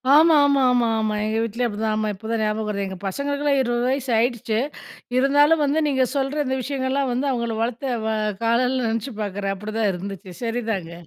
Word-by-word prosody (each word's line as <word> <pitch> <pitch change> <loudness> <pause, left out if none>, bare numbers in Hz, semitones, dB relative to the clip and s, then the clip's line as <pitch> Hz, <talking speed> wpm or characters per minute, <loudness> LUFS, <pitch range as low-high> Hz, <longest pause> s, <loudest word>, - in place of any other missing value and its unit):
ஆமா, 320 +1 +7
ஆமா, 280 -1 +3
ஆமா, 240 -2 +3
ஆமா. 215 -1 0
எங்க 220 +1 -1
வீட்லயும் 235 +2 -1
அப்பிடிதான் 215 +1 -1
ஆமா. 215 0 0
இப்ப 220 +3 -10
தான் 225 -1 0
ஞாபகம் 215 0 -1
வருது. 200 -1 -2
எங்க 190 - -7
பசங்களுக்கெல்லாம் 280 +6 0
20 240 -1 0
வயசு 265 -1 -1
ஆகிடுச்சு. 230 -2 0 0.6
இருந்தாலும் 290 +4 +4
வந்து 295 +3 +1
நீங்க 265 -2 +2
சொல்ற 280 +2 0
இந்த 260 0 0
விஷயங்கள்லாம் 270 0 -1
வந்து 270 +3 0
அவுங்கள 235 -3 -2
வளர்த்து 245 +3 -2 0.2
வ - - 0 0.4
காலலலாம் 250 +1 +2
நினைச்சு 230 +3 -3
பார்க்குறேன். 200 -1 -2
அப்புடிதான் 215 +1 -1
இருந்துச்சு. 190 +1 -7
சரிதாங்க. 225 -7 -2
235 Hz, 180 wpm, -23 LUFS, 215-270 Hz, 0.6 s, ஆமா